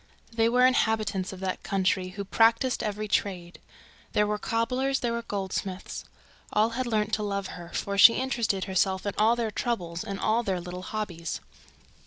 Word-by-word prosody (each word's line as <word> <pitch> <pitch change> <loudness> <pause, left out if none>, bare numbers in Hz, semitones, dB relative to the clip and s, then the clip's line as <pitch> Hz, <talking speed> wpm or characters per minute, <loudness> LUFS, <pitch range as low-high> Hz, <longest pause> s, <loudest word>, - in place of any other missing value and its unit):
There 225 0 +2
were 250 +1 +5
inhabitants 215 -6 +1
of 190 -1 -9
that 190 -1 -2
country 190 -1 0
who 200 +2 -6
practised 230 +5 +3
every 210 0 -3
trade. 185 -3 -2 0.5
There 210 - +3
were 210 0 -1
cobblers, 255 +5 0
there 235 -1 0
were 235 - -2
goldsmiths. 190 -3 -4 0.5
All 215 +2 +3
had 250 +2 -2
learned 215 -2 0
to 215 - +1
know 205 - -2
her 200 - -1
and 200 - -4
to - - -8
love - - -8
her, 170 -1 -9
for 200 0 -2
she 230 - +10
always 255 - -1
interested 230 -7 0
herself 190 0 0
in 205 - -1
all 220 +2 +5
their 230 -2 -2
troubles 180 -7 -2
and 200 -3 -5
all 220 +2 +2
their 190 -5 -1
little 180 +1 -7
hobbies. 185 -5 -4
210 Hz, 200 wpm, -27 LUFS, 190-230 Hz, 0.5 s, she